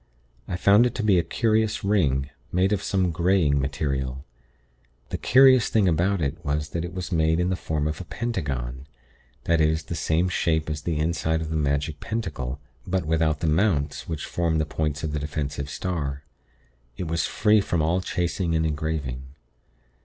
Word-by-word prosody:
I 90 - -3
found 105 +6 +5
it 120 - -6
to 110 - -2
be 100 -4 +4
a - - +1
curious 110 +1 +1
ring, 75 -9 +1 0.2
made 95 +3 +2
of 100 - 0
some 95 -3 0
greying 80 -4 +2
material. 65 -1 -2 0.8
The - - -4
curious 130 -2 +6
thing 105 -4 +3
about 90 +3 +1
it 70 - -3
was 75 +1 -1
that 85 +1 -3
it 85 - -5
was 90 0 -5
made 80 -1 +2
in 90 +1 +1
the - - +1
form 75 -3 -2
of 75 +4 -3
a - - -8
pentagon; 70 - -4 0.6
that 85 -1 +2
is, 80 0 +2
the 85 - -6
same 80 +2 +1
shape 80 -3 0
as 75 -1 -4
the 80 0 -2
inside 80 0 0
of 80 0 -5
the - - -1
magic 75 +1 -1
pentacle, 75 - -4 0.3
but 95 -2 0
without 80 -1 +1
the 80 - 0
'mounts,' 80 -4 +1
which 80 -3 -3
form 85 -2 0
the 80 - +1
points 75 -1 -2
of 80 - -2
the 75 - -2
defensive 75 -1 -4
star. 75 -6 -3 0.7
It 90 - -4
was 80 0 0
free 105 0 +3
from 85 -5 0
all 85 +4 +1
chasing 90 -1 -1
or 80 0 +1
engraving. 75 -4 -3
80 Hz, 185 wpm, -25 LUFS, 75-90 Hz, 0.8 s, curious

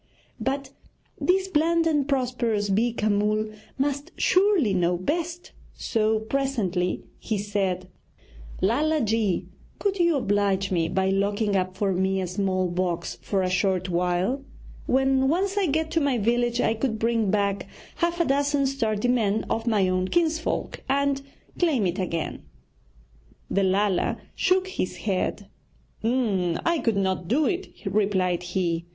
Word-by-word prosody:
But 270 0 -2 0.5
this 380 +1 +2
bland 330 -1 +2
and 295 -4 +2
prosperous 240 -6 0
Beeka 220 +1 +1
Mull 210 +1 +1 0.3
must 285 +3 -1
surely 370 - +3
know 175 -1 +2
best, 335 - -3 0.2
so 220 0 +1
presently 220 -8 -1 0.2
he 220 - -2
said: 195 -3 -1 0.7
'Lala 300 +10 +2
ji, 220 -4 +1 0.3
could 395 -2 -1
you 340 -2 +4
oblige 200 -5 +1
me 165 -3 +1
by 190 +1 +1
locking 200 +1 +1
up 185 0 -1
for 195 -1 +1
me 190 +1 +1
a 185 - -1
small 185 0 0
box 170 -8 -2
for 190 +8 0
a 185 - 0
short 185 0 +1
while? 180 +9 0 0.4
When 265 0 +3
once 380 +7 +1
I 400 -3 +2
get 315 +2 0
to 330 -1 +1
my 280 -3 +2
village 240 +2 +1
I 225 - +2
could 225 0 -1
bring 225 -2 +1
back 200 -1 0 0.3
half 340 0 0
a 340 - +3
dozen 280 0 +2
sturdy 230 -5 0
men 220 -4 +2
of 225 +1 -1
my 205 -5 +3
own 185 0 0
kinsfolk 320 - 0
and 280 0 +1 0.4
claim 295 - +2
it 180 +1 -1
again.' 170 -3 -3 1.1
The 200 - +2
Lala 195 0 +1 0.2
shook 375 0 +2
his 375 - -3
head. 200 0 -1 0.6
'I 225 - +1
could 225 -4 +1
not 190 -3 0
do 280 - +2
it,' 365 - -4
replied 190 -3 +1
he. 175 -2 -2
215 Hz, 145 wpm, -25 LUFS, 190-275 Hz, 1.1 s, you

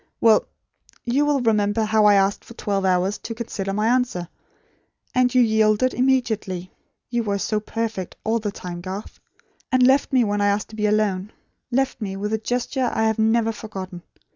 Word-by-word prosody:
Well 225 -2 +4 0.6
you 275 +5 +2
will 285 -2 +2
remember 215 -1 +2
how 215 0 +3
I 205 -1 +7
asked 195 0 +2
for 235 - -13
twelve 200 -3 -1
hours 185 +2 +1
to 230 - -6
consider 200 -4 -4
my 210 +2 0
answer; 240 -8 0 0.8
and 250 0 +3
you 250 - +6
yielded, 220 +2 +3
immediately; 220 -8 0 0.4
(you 240 -1 +1
were 205 -3 -1
so 215 +2 -1
perfect, 215 -3 -4
all 225 +1 +1
the 210 -2 -3
time, 175 -3 -7
Garth) 190 +3 -7 0.5
and 255 -1 +4
left 270 +2 +3
me, 255 -2 +4
when 205 -1 0
I 205 - +3
asked 205 +1 0
to 215 - -11
be 210 -1 0
alone; 210 -2 0 0.4
left 265 0 0
me, 195 -2 -3
with 210 +2 -3
a 220 - 0
gesture 245 +2 -1
I 220 - 0
have 220 0 +1
never 225 +1 +3
forgotten. 190 -5 -7
215 Hz, 185 wpm, -22 LUFS, 200-235 Hz, 0.8 s, I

